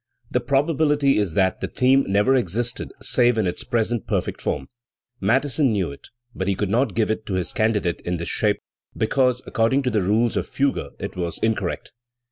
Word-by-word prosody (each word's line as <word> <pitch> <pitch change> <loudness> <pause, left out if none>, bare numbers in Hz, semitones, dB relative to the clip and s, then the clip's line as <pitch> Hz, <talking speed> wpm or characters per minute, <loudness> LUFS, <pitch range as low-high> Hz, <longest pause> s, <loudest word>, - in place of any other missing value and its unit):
The 125 - +2
probability 140 +1 +2
is 95 -6 -1
that 95 -1 +2
the - - -1
theme 135 +2 +3
never 100 +6 +3
existed 120 0 -1
save 120 -2 +3
in 110 - +2
its 90 +5 -3
present 115 -2 -1
perfect - - -2
form. - - -2 0.5
Mattheson 135 +2 +2
knew 95 -7 0
it, 70 - -12 0.3
but 95 - -3
he 100 - +1
could 100 0 -2
not 120 -2 +1
give 110 -1 +2
it 110 - -2
to 95 - -1
his 90 -2 -2
candidate 105 -6 0
in 90 0 -2
this 85 - -5
shape, 105 -2 +1 0.4
because 125 +2 +1
according 115 +5 +1
to 125 - 0
the 105 -2 +1
rules 110 +5 +1
of - - -1
fugue 135 - -1
it - - -5
was 85 -2 -3
incorrect. 110 -1 -1
115 Hz, 190 wpm, -23 LUFS, 100-130 Hz, 0.5 s, theme